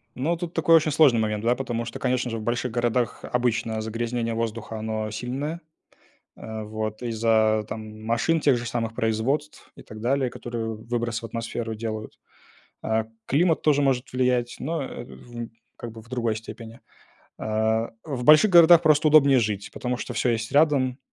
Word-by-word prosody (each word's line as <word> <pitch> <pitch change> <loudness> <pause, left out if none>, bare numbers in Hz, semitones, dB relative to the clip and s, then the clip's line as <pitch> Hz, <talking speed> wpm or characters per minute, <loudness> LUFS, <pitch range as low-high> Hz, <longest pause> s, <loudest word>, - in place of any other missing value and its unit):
Но 155 +7 0
тут 170 0 -6
такой 165 - +4
очень 155 -1 +3
сложный 140 -6 +5
момент, 105 -1 -1
да, 120 +2 +3
потому 120 -3 -3
что, 115 - -6
конечно 125 -1 0
же, 115 - -3
в 110 - -6
больших 120 +1 -1
городах 120 0 0
обычно 115 -2 -1
загрязнение 115 +1 -2
воздуха, 115 -1 -4
оно 110 0 -3
сильное. 135 +9 -4 0.7
А, 110 -1 -7
вот 110 +1 -5
из-за, 110 -2 +2
там, 110 0 -8
машин 115 +9 +1
тех 140 -4 +3
же 120 - -5
самых, 115 -1 -2
производств 115 +7 -2
и - - -13
так 110 0 -11
далее, 130 +2 +1
которые 115 -2 -5
выброс 115 +1 -3
в - - -7
атмосферу 115 0 -4
делают. 110 -1 -6 0.6
А, 110 0 0 0.2
климат 160 +4 +2
тоже 145 -2 +3
может 130 -3 0
влиять, 125 -1 0
но, 160 +3 -2
э, - - -7
в 115 - -9 0.3
как 115 - -8
бы 115 - -10
в 110 - -20
другой 120 -3 -1
степени. 115 +1 -10 0.6
А, 110 +1 0
в 135 -6 -4
больших 155 - +7
городах 170 -1 +8
просто 155 -1 +4
удобнее 140 -3 +6
жить, 105 -2 -2
потому 125 0 -3
что - - -6
всё - - 0
есть 115 +2 -2
рядом. 140 -4 +3
120 Hz, 175 wpm, -25 LUFS, 110-135 Hz, 0.7 s, городах